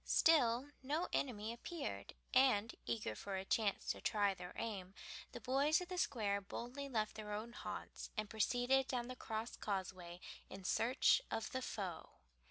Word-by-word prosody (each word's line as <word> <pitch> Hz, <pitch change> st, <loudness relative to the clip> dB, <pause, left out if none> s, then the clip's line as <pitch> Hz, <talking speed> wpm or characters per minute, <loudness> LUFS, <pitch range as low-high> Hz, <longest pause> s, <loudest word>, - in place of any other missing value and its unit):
Still 270 Hz, -4 st, +5 dB
no 300 Hz, +7 st, 0 dB
enemy 225 Hz, -4 st, 0 dB
appeared, 285 Hz, +5 st, -5 dB, 0.2 s
and, 240 Hz, -5 st, +5 dB
eager 115 Hz, -2 st, -1 dB
for 195 Hz, -, -4 dB
a 190 Hz, -, -3 dB
chance 205 Hz, -1 st, +1 dB
to -, -, -5 dB
try 205 Hz, -3 st, +3 dB
their 180 Hz, -1 st, -8 dB
aim, 195 Hz, -4 st, -4 dB, 0.4 s
the -, -, -6 dB
boys 275 Hz, +4 st, +3 dB
of 360 Hz, 0 st, -6 dB
the 365 Hz, -, -3 dB
Square 210 Hz, -, +1 dB
boldly 250 Hz, +7 st, -5 dB
left 215 Hz, -4 st, 0 dB
their 210 Hz, -1 st, -6 dB
own 220 Hz, +3 st, -4 dB
haunts -, -, -6 dB
and 215 Hz, 0 st, 0 dB
proceeded 245 Hz, +5 st, +3 dB
down 245 Hz, -1 st, -1 dB
the 255 Hz, -, -4 dB
Crosscauseway 195 Hz, -6 st, -3 dB, 0.3 s
in 190 Hz, 0 st, -8 dB
search 250 Hz, -, +4 dB
of 225 Hz, -, -2 dB
the 260 Hz, -, -1 dB
foe. 195 Hz, -8 st, -4 dB
225 Hz, 160 wpm, -39 LUFS, 200-260 Hz, 0.4 s, Still